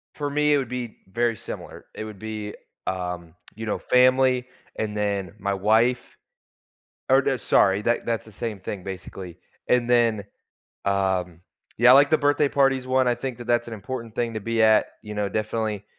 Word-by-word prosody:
For 145 -1 -3
me, 150 +1 +2
it - - +5
would 130 -4 -2
be 125 -3 -5
very 120 +1 +1
similar. - - -9
It - - -6
would 105 -2 -9
be, 110 -1 -6 0.3
um, 90 -3 -4 0.2
you 110 +1 -6
know, 105 - -1
family, 130 0 +4 0.3
and 105 -1 -2
then 100 -2 -2
my 100 0 -1
wife. 110 +5 +1 0.9
Oh, 135 0 +3
sorry, 100 -4 +3
that 120 +1 0
that's 115 -1 -2
the 110 - -14
same 105 -1 -5
thing, 95 0 -6
basically. 95 -1 -8 0.3
And 125 -1 +2
then, 115 -4 +3 0.6
um, 95 -3 0 0.4
yeah, 125 +1 +7
I, - - +10
like, 140 +3 +6
the 155 - +4
birthday 145 0 +2
parties 135 -2 +2
one. 130 0 +2
I 120 - +3
think 125 0 -5
that 120 - -8
that's 120 0 +1
an 115 - -5
important 115 +2 -6
thing 115 -2 -2
to 110 - -3
be 115 +2 0
at, 110 -1 +5 0.2
you 105 0 -7
know, 105 -1 -1
definitely, 110 -1 -2
115 Hz, 185 wpm, -24 LUFS, 100-125 Hz, 0.9 s, I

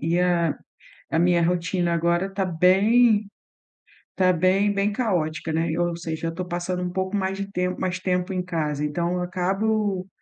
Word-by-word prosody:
e 175 - +2
a 175 -3 +1 0.5
a 160 - +1
minha 175 0 +3
rotina 175 0 0
agora 170 +2 +1
está 195 0 -2
bem 205 +5 +4 0.9
tá 185 -1 +4
bem 190 +4 +2
bem 200 +1 0
caótica, 170 -8 -1
né, 160 +1 0
e 165 - -2
ou 175 -1 0
seja, 165 -1 -4
eu 165 - 0
estou 180 +2 -5
passando 180 +1 -3
um 180 - -2
pouco 190 +2 -2
mais 190 0 -2
de 200 0 -5
tem 180 -1 -1
mais 185 -1 -2
tempo 180 +1 -1
em 185 - -1
casa, 150 -4 -2
então, 170 +4 -1
eu 180 - -1
acabo 190 +2 -1
180 Hz, 180 wpm, -24 LUFS, 170-195 Hz, 0.9 s, bem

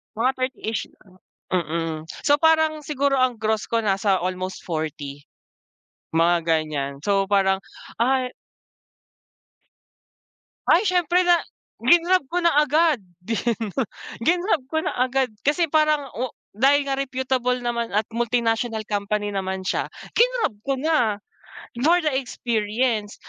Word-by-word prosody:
Mga 245 +4 +2
30-ish, 255 -4 -3 0.2
o 190 - -22 0.4
mm. 165 -2 -2 0.2
So, 290 0 +4
parang 315 -1 +3
siguro 280 -2 +1
ang 255 -2 +2
gross 220 0 -1
ko 230 0 +1
nasa 195 -1 +2
almost 185 +1 -4
40, 150 -4 -5 0.9
mga 170 +1 +4
ganyan. 155 -4 0
So, 195 -1 +1
parang 190 -1 +2 0.4
ay 255 +1 +2 2.4
Ay, 350 - +5
syempre 360 -2 +2
na 350 -1 +5 0.4
grinab 345 -2 +4
ko 350 +4 -1
na 340 - +5
agad. 300 -1 +3 0.2
'Di 225 +2 -2 0.2
'no, 210 - -4 0.5
grinab 350 - +1
ko 315 +2 -1
na - - -1
agad, 255 -1 +1 0.2
kasi 335 +4 +3
parang 305 -3 +2
o 250 0 -4 0.2
dahil 280 +4 +4
nga 270 - 0
reputable 260 -2 0
naman 235 -1 -1
at 215 - +3
multinational 230 -1 0
company 205 0 -1
naman 190 -1 -3
siya, - - -1 0.3
grinab 480 - +2
ko 275 - +2
na 255 -8 +1 0.6
for 335 +5 +5
the 305 - +2
experience. 225 -3 -1
240 Hz, 125 wpm, -23 LUFS, 200-295 Hz, 2.4 s, Ay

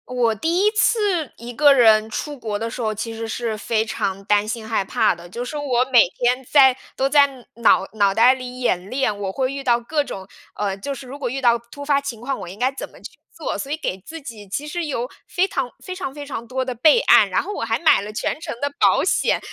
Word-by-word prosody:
我 245 -3 +1
第 335 - +1
1 425 - +4
次 410 - +1
一 240 +1 -8
个 290 +3 +6
人 220 -4 +5
出 290 +5 -5
国 215 -4 -3
的 230 +1 -3
时 245 - -6
候， 215 -2 0
其 220 +2 -5
实 225 0 -5
是 225 -1 -3
非 220 0 0
常 195 -2 -3
担 205 0 +2
心 225 0 -5
害 220 -3 0
怕 - - +2
的。 170 +1 -13
就 240 +7 -5
是 300 - -5
我 255 -4 +1
每 245 - +8
天 250 +5 0
在 265 -3 +6 0.2
都 265 - +1
在 285 0 +5 0.3
脑 235 0 +3
脑 200 -2 +2
袋 240 +5 +6
里 255 -1 -7
演 190 -6 -1
练， 255 -4 0
我 200 -2 -3
会 260 +5 -1
遇 275 0 -5
到 240 -2 +3
各 295 +5 -1
种， 190 -8 -8 0.3
呃， 200 -2 -2
就 200 +9 -5
是 260 -1 -10
如 270 +3 -8
果 255 -4 -2
遇 265 +3 -3
到 240 -2 +4
突 235 +5 -11
发 280 -1 +2
情 270 -5 -6
况， 265 +3 -3
我 185 - -7
应 190 - -10
该 255 +2 +2
怎 - - -7
么 - - -18
去 - - -10 0.2
做， - - -4
所 275 - -5
以 305 - -1
给 190 - -3
自 320 - -10
己 220 -7 -10
其 280 +10 -4
实 345 +2 -3
有 250 -5 -3 0.2
非 370 +1 +1
常 270 -8 -2 0.2
非 370 - -5
常 275 -8 -5
非 290 0 -8
常 255 -5 -6
多 260 +1 -2
的 255 - -3
备 305 - +5
案， - - +6
然 - - +1
后 415 - -6
我 - - -4
还 - - 0
买 325 -10 +4
了 205 +1 -7
全 215 - -3
程 - - -5
的 285 - -1
保 - - +4
险。 - - +1
250 Hz, 270 characters per minute, -21 LUFS, 220-280 Hz, 0.3 s, 每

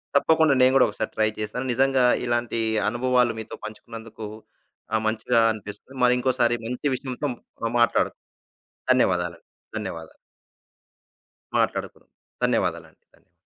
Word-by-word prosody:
తప్పకుండా 160 +1 +4
నేను 130 0 +6
గూడా 135 - +7
ఒకసారి - - -4
ట్రై 110 - +3
చేస్తాను. 110 +4 -3
నిజంగా 135 +1 +3 0.2
ఇలాంటి 120 -1 -1 0.3
అనుభవాలు 125 +1 +2
మీతో 110 - -7
పంచుకున్నందుకు 110 0 -9 0.7
ఆ! - - +4
మంచిగా 110 +1 +1
అనిపిస్తుంది. 105 +4 -9
మరి 125 0 +6
ఇంకోసారి 125 -2 +2
మంచి 125 +4 -2
విషయంతో 130 +2 -4 0.4
ఆ! - - +3
మాట్లాడు 115 - +3 0.8
ధన్యవాదాలండి. 90 -9 +1 0.3
ధన్యవాదాలు. 85 -6 -6 1.4
మాట్లాడుకుందాం. - - -2 0.3
ధన్యవాదాలండి. - - 0 0.2
ధన్య - - -29
120 Hz, 110 wpm, -25 LUFS, 110-130 Hz, 1.4 s, గూడా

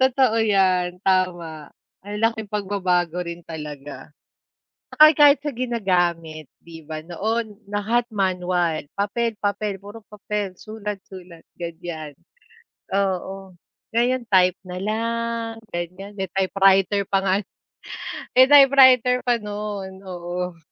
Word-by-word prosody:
Totoo 260 -3 +3
‘yan, 185 -4 +2
tama, 175 -5 0 0.3
ang 205 +2 -6
laking 225 -2 0
pagbabago 180 -4 0
rin 170 0 -8
talaga. 150 -2 -8 0.8
Na - - -12
kahi 310 +1 +9
kahit 290 0 +6
sa 295 - -2
ginagamit 175 - -1 0.2
'di 165 -1 -11
ba, 155 0 -6
noon, 215 +5 -3
lahat 225 +4 0
manual, 180 -6 -1
papel, 225 +2 -1
papel, 205 0 -2
puro 205 +3 -11
papel, 210 -2 -4
sulat, 210 -2 -7
sulat, 180 -3 -13
ganiyan, 165 -3 -7 0.8
oo. 195 0 -2 0.4
Ngayon 245 +2 +1
type 185 -1 +5
na 180 -1 -7
lang, 230 +2 -2
ganiyan, 185 +4 -6
may 190 -3 -4
typewriter 195 +1 +3
pa 195 - +4
nga, 190 -1 +1 1.0
typewriter 260 -2 +7
pa 245 -2 +1
no’n, 205 -2 -6
oo. 180 -1 -5
195 Hz, 115 wpm, -22 LUFS, 180-225 Hz, 1.0 s, kahi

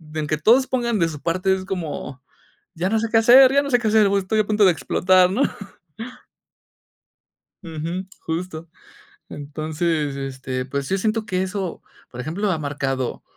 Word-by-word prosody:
aunque 155 0 -1
todos 240 - +4
pongan 235 -3 -1
de 165 -2 +1
su 150 -2 -8
parte, 185 +4 0
es 190 0 -3
como, 155 -8 -5 0.5
ya 180 +2 -2
no 220 +1 +1
sé 230 - -1
qué 225 - +4
hacer, 255 +4 +7
ya 280 - +4
no 280 - -4
sé 245 -2 +3
qué 220 - 0
hacer, 215 -1 +4
voy 200 0 +2
estoy 215 +4 -1
a 215 - +2
punto 215 -1 +2
de 185 - +6
explotar, 185 +2 +3
¿no? 250 +9 +1 2.2
Ujú. 165 +3 -5
Justo. 165 -1 -5 0.6
Entonces 155 0 -3
este, 130 -1 -4
pues 140 +1 -4
sí 195 - -1
siento 220 +2 -1
que 185 0 -1
eso, 190 -2 -4 0.3
por 125 - -8
ejemplo, 180 +9 -2
ha 165 - 0
marcado 135 -3 -3
180 Hz, 170 wpm, -22 LUFS, 150-210 Hz, 2.2 s, hacer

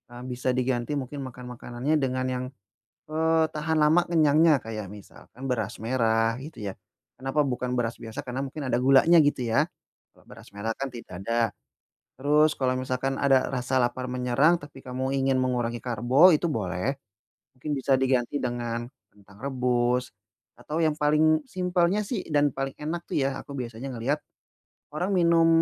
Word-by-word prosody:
Eee, 120 - -8
bisa 125 +1 -1
diganti 125 +1 -1
mungkin 135 +2 -6
makan 125 0 -10
makanannya 125 +6 -1
dengan 130 -1 -1
yang, 125 0 -2 0.6
eee, 160 +1 +2
tahan 155 +1 -1
lama 155 +4 +5
kenyangnya 155 -1 +5
kayak 110 -3 -5
misalkan 105 +5 -12
beras 110 -5 -2
merah, 115 -1 +2
gitu 155 -2 -10
ya. 100 -2 -3 0.5
Kenapa 135 +3 +1
bukan 125 -1 -2
beras 115 -1 -1
biasa 110 -1 -6
karena 125 +1 -3
mungkin 140 +2 -6
ada 120 - +2
gulanya, 135 +6 +6
gitu 145 -4 +1
ya. 115 0 +2 0.5
Kalau - - -23
beras - - -14
merah 110 +2 -2
kan 135 0 -3
tidak 95 -6 -9
ada. 115 -1 +1 0.7
Terus 150 +3 +3
kalau 130 -1 +1
misalkan 130 +1 -2
ada 135 -2 +3
rasa 130 0 -1
lapar 120 +1 -1
menyerang, 125 +7 +3
tapi 145 -2 -12
kamu 130 +2 -2
ingin 135 -1 +2
mengurangi 120 -2 -1
karbo 125 - +5
itu 170 - -1
boleh 100 +1 -1 0.6
mungkin 150 +4 -5
bisa 135 0 +2
diganti 130 0 +1
dengan 120 -1 -3 0.3
kentang 100 0 -19
rebus 125 -2 0 0.5
atau 150 +6 -4
yang 155 - +3
paling 155 +1 +3
simpelnya 180 +2 +1
sih 205 -1 -4
dan 145 -1 +3
paling 135 +1 -4
enak 165 +3 -4
tuh - - -4
ya 135 -1 0
aku 140 - -9
biasanya 125 +2 -5
ngeliat 135 +6 -1 0.8
orang 180 +5 -1
minum 170 -2 +4
130 Hz, 160 wpm, -26 LUFS, 120-150 Hz, 0.8 s, gulanya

